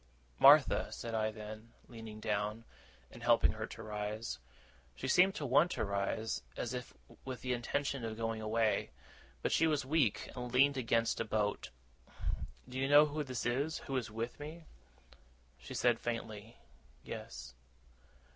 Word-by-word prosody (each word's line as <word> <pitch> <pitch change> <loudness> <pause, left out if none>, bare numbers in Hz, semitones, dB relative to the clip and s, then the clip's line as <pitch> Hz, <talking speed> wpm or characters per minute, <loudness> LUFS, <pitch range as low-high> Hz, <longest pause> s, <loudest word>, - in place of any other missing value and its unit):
'Martha,' - - +7
said 115 - -5
I 110 -1 +1
then, 110 +1 -9
leaning 110 -3 -9
down, 105 +1 -2 0.5
and 120 - -12
helping 120 -1 +4
her 110 0 -5
to - - -9
rise 105 - -4 0.6
she 130 - -4
seemed 185 +6 +5
to 145 - -3
want 145 +6 +5
to - - -1
rise 100 - -1 0.2
as - - -3
if - - -6 0.3
with 130 -3 -6
the 125 -1 -1
intention 135 +2 -1
of 110 -1 -4
going 115 -1 -2
away, 110 0 +1 0.5
but - - +1
she 165 - +4
was 150 -4 +1
weak, 135 -6 +1
and 125 -1 -5
leaned 140 +3 +5
against 115 -2 +1
a - - +1
boat. 105 -2 -1 1.0
'Do 130 +1 -5
you 135 +1 +1
know 145 +1 +8
who 150 0 -2
this 130 -4 -4
is, 140 +6 0
who 135 - -3
is 125 -4 -1
with 115 +4 -4
me?' 155 +3 -8 0.9
She 65 - -8
said 120 -2 +3
faintly, 115 -2 -5 0.5
'Yes. - - -7
115 Hz, 155 wpm, -34 LUFS, 110-135 Hz, 1.0 s, know